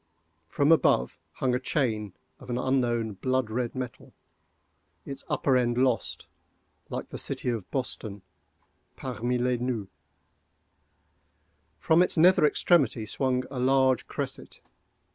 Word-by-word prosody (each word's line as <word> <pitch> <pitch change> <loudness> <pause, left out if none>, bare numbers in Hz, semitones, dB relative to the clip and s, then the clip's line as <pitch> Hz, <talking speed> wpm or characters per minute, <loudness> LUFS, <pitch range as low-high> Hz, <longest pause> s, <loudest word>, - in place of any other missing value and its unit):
From 140 - +2
above, 65 - +3
hung 130 -2 0
a 125 - +1
chain 110 -7 -1 0.3
of - - -13
an 120 - -1
unknown 120 -4 0
blood 130 +2 -1
red 120 +1 -2
metal—its 85 - -11
upper 135 - +2
end 120 -1 +1
lost, 125 -2 0 0.6
like - - -5
the - - -7
city - - -1
of 115 -6 -3
Boston, 110 -6 -5 0.7
parmi 125 -1 -2
les 125 0 +1
nues. 120 -5 -3 1.9
From 160 +2 +3
its 180 - +1
nether 175 -1 +6
extremity 140 -9 +2
swung 130 +3 -1
a 130 - -4
large 130 0 +3
cresset. - - -5
125 Hz, 120 wpm, -27 LUFS, 110-130 Hz, 1.9 s, nether